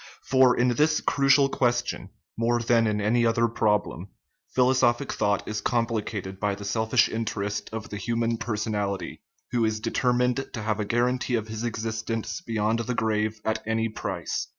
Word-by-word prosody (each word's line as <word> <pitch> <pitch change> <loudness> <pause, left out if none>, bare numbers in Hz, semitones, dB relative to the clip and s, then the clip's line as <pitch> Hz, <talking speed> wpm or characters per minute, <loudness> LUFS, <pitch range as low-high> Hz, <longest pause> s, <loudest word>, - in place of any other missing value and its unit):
For 130 -1 +4
in 125 +1 +3
this 150 +5 +2
crucial 140 0 +4
question, 120 -2 -1 0.3
more 120 +1 +1
than 115 -1 +3
in 105 -1 0
any 110 +4 +2
other 115 0 +3
problem, 105 -5 0 0.5
philosophic 130 0 +3
thought 105 -2 0
is 105 -1 -3
compli 115 -1 0
cated 95 -3 -6
by 100 -1 0
the 100 0 -9
selfish 110 +2 +2
interest 105 -2 -3
of 110 -1 -6
the 105 - -5
human 115 +2 -1
personality, 105 -3 -3 0.3
who 120 -1 +1
is 110 -1 0
determined 125 +3 +1
to 110 - -4
have 110 0 -1
a 105 - -1
guarantee 125 +3 0
of 110 -1 -3
his 110 +1 -5
existence 115 -1 -3
beyond 110 0 0
the 120 +1 -2
grave 110 -1 0
at 110 - 0
any 110 0 0
price. 110 - -4
115 Hz, 165 wpm, -26 LUFS, 105-120 Hz, 0.5 s, For